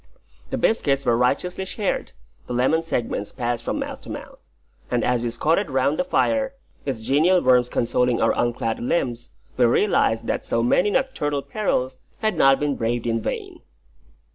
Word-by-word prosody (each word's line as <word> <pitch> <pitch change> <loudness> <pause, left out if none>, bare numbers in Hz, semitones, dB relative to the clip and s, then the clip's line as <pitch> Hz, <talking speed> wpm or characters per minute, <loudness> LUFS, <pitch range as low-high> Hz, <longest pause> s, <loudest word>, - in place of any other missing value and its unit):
The - - -2
biscuits 140 -11 +1
were 120 - +3
righteously 160 +10 0
shared, 200 +1 -2 0.3
the - - -4
lemon 130 +7 +2
segments 115 -9 -3
passed 120 -2 -2
from - - -2
mouth - - -5
to - - -12
mouth; - - -9 0.5
and 120 -2 0
as 125 0 +1
we 120 - -1
squatted 160 - +1
round 135 +3 +1
the - - +1
fire, 275 0 +1 0.3
its 130 -5 -2
genial 160 +9 +4
warmth 125 -4 +3
consoling 125 0 +1
our 115 - +3
unclad 120 -2 -1
limbs, 120 -2 -1 0.3
we 125 - +5
realised 115 - +2
that - - -2
so 115 - 0
many 180 +11 +3
nocturnal 150 - -1
perils 130 -6 -1 0.2
had 215 -1 0
not 135 0 +5
been 145 -1 0
braved 115 0 -1
in 115 -1 0
vain. - - -5
130 Hz, 165 wpm, -23 LUFS, 120-165 Hz, 0.5 s, we